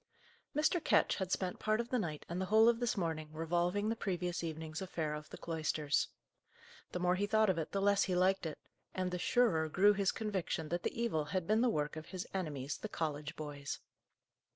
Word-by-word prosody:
Mr. 310 +3 +2
Ketch - - +3
had 190 -2 -3
spent 185 -2 -1
part 215 +1 +1
of 235 0 -2
the 250 - +1
night 155 -7 -4
and 175 +2 -3
the - - 0
whole 220 +2 +6
of 235 -1 +4
this 240 -3 0
morning 160 -4 -2
revolving 175 +5 0
the 225 - +1
previous 180 -4 -2
evening's 160 0 -4
affair 160 -5 -2
of 150 0 -7
the - - -8
cloisters. 155 -2 0 0.8
The - - -2
more 180 0 +3
he 200 +3 0
thought 215 -1 +4
of 170 - -2
it, 160 - -4
the 195 0 0
less 200 0 +4
he 185 - 0
liked 185 0 +3
it, 155 - -6 0.4
and 185 -1 -1
the 180 - -2
surer 170 -9 +3
grew 205 +6 +5
his 195 -1 +2
conviction 190 -7 -2
that 175 +2 -1
the - - -3
evil 185 -11 +1
had 185 +3 -2
been 215 +4 +3
the 250 - +4
work 150 -5 -1
of 155 - -7
his 185 -1 -5
enemies, 150 -7 -3
the 215 - -5
college 150 -5 -3
boys. 145 -2 -5
180 Hz, 215 wpm, -35 LUFS, 155-205 Hz, 0.8 s, whole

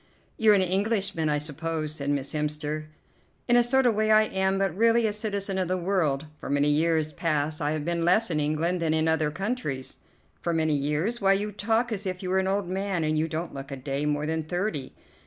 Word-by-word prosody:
"You're 215 -2 +5
an 190 - +3
Englishman, 195 -3 0
I 150 - +2
suppose," 155 +1 -3
said 145 -2 -4
Miss 140 0 -1
Hemster. 150 0 -2 0.6
"In 240 - +4
a 240 - +6
sort 265 +2 +3
of 240 - +4
way 215 +1 +1
I 215 0 +6
am, 190 -2 0
but 195 -3 0
really 230 +2 +4
a 210 - 0
citizen 200 -2 -2
of 185 - 0
the 185 +1 0
world. 170 -6 0
For - - -7
many 145 +1 +2
years 155 +1 +2
past 155 -1 -1
I 145 +1 0
have 155 -1 -3
been 170 0 -1
less 180 +4 +3
in 155 - +1
England 160 +4 0
than 160 -1 +1
in 160 0 +1
other 160 -1 +2
countries." 170 - -4 0.4
"For 170 - -1
many 160 -1 +2
years? 150 +11 -1
Why, 195 0 +5
you 205 +2 -1
talk 225 +4 0
as 200 -2 -3
if 185 0 -4
you 185 - -2
were 190 - +3
an 190 - 0
old 195 -1 0
man, 190 -1 -1
and 155 0 +1
you 155 +1 +1
don't 165 +2 -4
look 135 0 -7
a 135 - -5
day 140 +2 -2
more 150 0 0
than 160 +1 -1
thirty." 175 -4 -3
170 Hz, 230 wpm, -26 LUFS, 150-200 Hz, 0.6 s, a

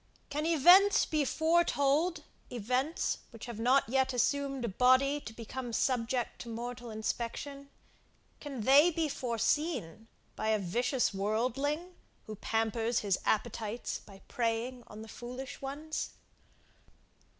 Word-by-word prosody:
Can 300 +2 -1
events 355 +6 +6
be 305 -2 0
foretold, 320 0 +2 0.3
events 250 +7 -1
which 230 -3 -10
have 235 -2 -7
not 255 +4 +3
yet 265 +2 +1
assumed 275 0 0
a - - -1
body 260 +7 +3
to 225 - -9
become 240 +2 -6
subject 245 0 0
to 235 - -8
mortal 240 +1 -6
inspection, 240 +6 -4 0.7
can 275 -5 -6
they 280 +8 +6
be 330 -2 -1
foreseen 235 - -1 0.3
by 215 - -3
a 220 0 +3
vicious 240 +6 0
worldling, 255 - -1 0.3
who 215 - -7
pampers 225 +2 0
his 200 -3 0
appetites 220 +1 -1
by 195 -2 -16
preying 235 +1 -2
on 215 +1 -9
the - - -11
foolish 250 +3 -8
ones? 290 +3 -4
250 Hz, 125 wpm, -31 LUFS, 225-285 Hz, 0.7 s, events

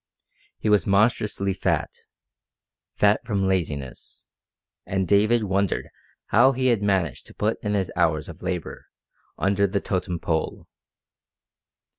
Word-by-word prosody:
He - - -4
was 105 -5 +3
monstrously 100 -1 +2
fat 95 - -1 1.0
fat 105 +1 +3
from 100 -4 -1
laziness; 75 -8 -3 0.5
and 95 -1 -2
David 110 +5 +3
wondered 100 -1 -1 0.4
how 130 +4 +5
he 130 0 +1
had 115 -4 +2
managed 95 -9 0
to - - -15
put 110 +2 -1
in 105 -1 0
his 95 -3 -1
hours 80 -3 +1
of 85 -1 -11
labour 90 -2 -5 0.5
under 100 +1 +2
the 100 +1 -1
totem 90 -2 -2
pole. 80 -1 -2
100 Hz, 125 wpm, -24 LUFS, 90-105 Hz, 1.0 s, how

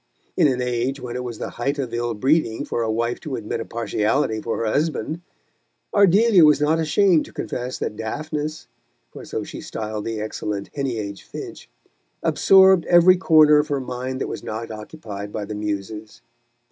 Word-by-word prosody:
In 165 - +4
an 125 -2 0
age 125 +3 -1
when 125 -2 -6
it 125 - -3
was 120 -3 -6
the - - -5
height 140 +4 0
of 130 -4 -4
ill 120 -1 -2
breeding 130 -1 +1
for - - -2
a 110 -1 0
wife 115 +2 -1
to 150 -5 -5
admit 110 -3 -4
a - - -4
partiality 110 +1 -1
for 115 - -3
her 115 - -2
husband, 150 +5 -1 0.7
Ardelia 200 0 +5
was 150 -2 +6
not 155 +2 +2
ashamed 165 +1 +3
to - - -14
confess 125 +1 -4
that - - -4
Daphnis 150 +7 -4 0.5
for - - -10
so - - -4
she - - -8
styled 110 -1 -5
the 115 -1 -3
excellent 105 -1 -4
Heneage 115 -8 -3
Finch - - -9 0.5
absorbed 190 -2 +5
every 175 +1 +7
corner 155 -4 +6
of 150 - 0
her 145 -2 -1
mind 130 0 -5
that - - -1
was - - -6
not 110 +1 -5
occupied 105 -3 -8
by 105 -1 -4
the 105 - -6
Muses. 105 +1 -5
125 Hz, 180 wpm, -22 LUFS, 110-155 Hz, 0.7 s, every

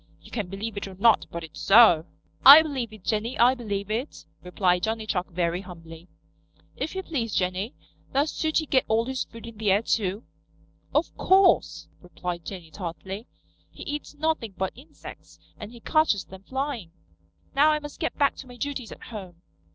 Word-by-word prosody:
You - - -17
can 210 -6 -3
believe 205 +3 -6
it 200 - -4
or 190 - -10
not, 220 +4 +4
but 170 0 -6
it's 155 -1 -10
so." 195 -7 +6 0.4
"I 285 +4 +11
believe 265 -7 -4
it, 215 -4 -13
Jenny, 225 +4 -1
I 245 +2 +6
believe 205 -5 -4
it," 240 +7 -4 0.2
replied 180 0 +1
Johnny 220 +1 -2
Chuck 185 -4 -2
very 175 0 -1
humbly. 165 -2 -12 0.7
"If 320 - -4
you 380 - -3
please, 240 - -3
Jenny, 185 +5 -1 0.4
does 285 +3 +1
Sooty 315 0 0
get 265 -3 +2
all 225 +1 +2
his 260 0 -3
food 230 0 -12
in 230 -2 -11
the 215 -2 +1
air 200 +3 +3
too?" 205 -1 -1 0.7
"Of - - 0
course," 380 -1 +3
replied 180 -1 -6
Jenny 175 -5 -8
tartly. 190 +5 -6 0.4
"He - - -11
eats 295 0 -5
nothing 290 -9 -1
but 190 0 -2
insects, 265 +6 -13 0.2
and 210 0 -8
he 240 - -12
catches 310 - +2
them 190 0 -12
flying. 265 - -4 0.7
Now 295 +3 +6
I 305 - +3
must 295 -1 -9
get 320 - -2
back 280 -2 +3
to 265 - -9
my 245 -1 -12
duties 275 -4 -4
at - - -11
home." 185 -6 -9
220 Hz, 180 wpm, -26 LUFS, 185-265 Hz, 0.7 s, I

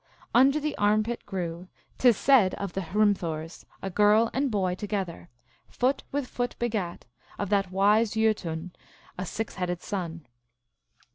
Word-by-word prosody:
" - - -27
Under 275 +3 +4
the 305 0 -2
armpit 215 +3 +1
grew, 180 -2 -4 0.3
t 255 - +6
is 225 - +3
said 240 -10 +4
of 200 -3 -5
the 195 - -2
Hritnthurs, 175 -4 -1 0.2
a 195 - -3
girl 210 +4 +4
and 275 +1 +1
boy 190 -5 0
together; 190 -3 -4 0.4
foot 265 +2 0
with 285 -1 -1
foot 245 0 -3
begat, 215 -7 -3 0.3
of 205 - -3
that 195 -2 +2
wise 205 +4 +3
Jbtun, 185 -6 0 0.5
a 185 - -3
six 225 +5 -4
headed 180 -1 -2
son." 170 -5 -4
205 Hz, 150 wpm, -27 LUFS, 180-225 Hz, 0.5 s, t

